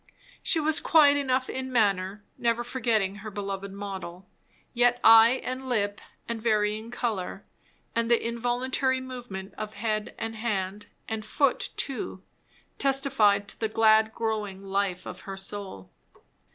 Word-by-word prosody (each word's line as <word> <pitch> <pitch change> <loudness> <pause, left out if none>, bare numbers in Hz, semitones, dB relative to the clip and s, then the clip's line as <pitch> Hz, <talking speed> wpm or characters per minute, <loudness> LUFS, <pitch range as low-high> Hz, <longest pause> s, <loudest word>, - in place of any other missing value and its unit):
She 355 -4 +1
was 310 0 +3
quiet 295 -3 +5
enough 260 -2 +1
in 260 0 -4
manner, 200 -3 +1
never 235 0 0
forgetting 220 -6 0
her 210 +1 -7
beloved 200 -1 -5
model; 190 -2 -7 0.5
yet 245 0 +3
eye 225 +3 +8
and 260 +1 -4
lip 205 -4 0 0.3
and 230 -1 -4
varying 215 0 +1
colour, 210 -6 -3 0.5
and 230 0 +1
the 235 - +5
involuntary 250 +3 0
movement 245 -7 -7
of 215 0 -5
head 215 0 -2
and 225 0 -4
hand, 205 -3 -3 0.2
and 220 -1 -3
foot 280 +3 +1
too, 235 -8 -3 0.6
testified 235 -8 +3
to - - -6
the 220 - 0
glad 220 0 +4
growing 210 -4 -3
life 195 -2 -1
of - - -7
her 195 -1 -7
soul. 195 - -7
220 Hz, 140 wpm, -27 LUFS, 200-245 Hz, 0.6 s, eye